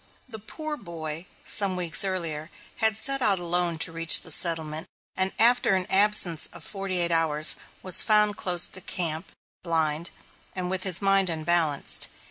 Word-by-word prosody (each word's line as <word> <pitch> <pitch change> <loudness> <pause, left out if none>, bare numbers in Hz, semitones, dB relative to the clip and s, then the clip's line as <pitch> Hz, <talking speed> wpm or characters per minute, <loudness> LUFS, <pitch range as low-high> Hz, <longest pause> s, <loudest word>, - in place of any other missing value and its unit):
The 220 -3 -11
poor 305 +8 -8
boy, 165 - -9 0.2
some 200 -3 +3
weeks 175 -1 +3
earlier, 170 -5 -5 0.3
had 220 -1 +2
set 275 +4 +1
out 200 -5 +3
alone 175 -1 -3
to 165 - -1
reach 165 0 +5
the 160 - -2
settlement, 160 0 -1 0.3
and 190 0 -1
after 235 -3 +2
an 185 -1 -2
absence 195 -5 +2
of - - -12
forty 195 -2 -5
eight 170 -1 -1
hours 155 -2 +3 0.3
was 185 - +3
found 210 -1 +3
close 180 -2 +3
to 185 - -1
camp, 170 -2 0 0.3
blind, 160 -1 -2 0.5
and 180 -1 -5
with 190 -1 -4
his 190 +1 +1
mind 195 -1 +2
unbalanced. 160 -2 +1
180 Hz, 160 wpm, -23 LUFS, 165-195 Hz, 0.5 s, reach